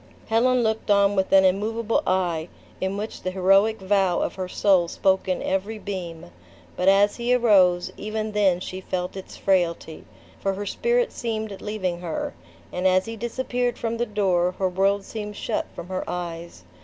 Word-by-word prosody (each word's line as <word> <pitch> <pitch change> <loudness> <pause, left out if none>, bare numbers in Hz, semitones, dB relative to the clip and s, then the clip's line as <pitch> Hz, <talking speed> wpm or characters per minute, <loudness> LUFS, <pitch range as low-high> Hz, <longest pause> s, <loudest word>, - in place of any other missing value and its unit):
Helen 245 +2 +3
looked 220 -1 -1
on 200 0 +4
with 190 -1 0
an 190 -1 +6
immovable 220 +4 +1
eye, 175 -3 0 0.3
in 190 +1 -1
which 215 +2 -5
the 185 - -2
heroic 195 +4 +3
vow 190 -2 +2
of - - -1
her 185 -1 -4
soul 185 -2 +3
spoke 190 +2 +1
in 185 - -1
every 200 +4 -1
beam; 175 - -6 0.4
but 180 - -1
as 200 +1 +5
he 240 +1 +2
arose, 185 -7 +4
even 215 +1 -3
then 200 -4 +2
she 185 +1 -6
felt 180 0 -3
its 190 - -9
frailty, 170 -4 0 0.4
for 195 -1 -1
her 205 +1 -5
spirit 475 - +1
seemed 220 -4 -4
leaving 190 -5 -3
her; 170 -3 -4 0.4
and 180 +1 +1
as 185 0 +3
he 225 - -6
disappeared 245 +1 -2
from 230 0 -2
the 240 +1 -1
door, 185 -4 +1
her 190 -1 +1
world 195 +2 +1
seemed 210 -2 -6
shut - - -2
from 170 - -7
her 185 0 -2
eyes. 170 -1 -6
195 Hz, 175 wpm, -24 LUFS, 185-215 Hz, 0.4 s, an